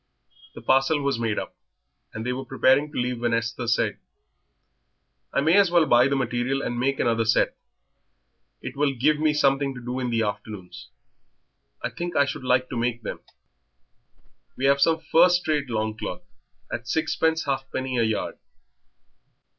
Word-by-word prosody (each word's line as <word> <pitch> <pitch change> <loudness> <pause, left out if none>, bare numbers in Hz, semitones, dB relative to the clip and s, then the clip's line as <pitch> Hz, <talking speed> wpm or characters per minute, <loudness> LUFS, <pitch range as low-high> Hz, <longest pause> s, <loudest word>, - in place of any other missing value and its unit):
The - - -10
parcel 135 +3 +3
was 140 -4 0
made 115 -3 -1
up, - - -5 0.6
and 110 +1 -6
they 125 - -1
were 130 +1 -5
preparing 135 +3 +2
to - - -7
leave, 125 -1 -1
when 120 -1 +1
Esther 115 +1 -3
said 115 - +1 1.3
"I - - +1
may 160 +5 +3
as 200 -2 +5
well 170 -2 +4
buy 120 -2 +5
the 140 - 0
material 130 +1 -1
and 120 - -3
make 135 +2 0
another 115 -1 +2
set 110 0 +2 1.1
it 130 - -6
will 140 -1 +1
give 150 +5 +2
me 155 0 +3
something 140 -2 +1
to - - -7
do 125 +1 -4
in 125 -1 -2
the 115 -1 +1
afternoons. 105 - -6 0.9
I - - -2
think 175 0 -5
I 140 - +4
should 140 - -5
like 130 0 +2
to - - -4
make 120 0 -1
them." - - -5 1.4
"We 130 - -1
have 140 0 +4
some 160 +2 +3
first 175 +1 +4
rate 150 -4 0
longcloth 110 -1 -3 0.5
at 120 - -5
sixpence 160 +3 0
half 135 -1 -2
penny 130 -1 -2
a - - +3
yard." 110 -1 -2
130 Hz, 170 wpm, -25 LUFS, 120-145 Hz, 1.4 s, as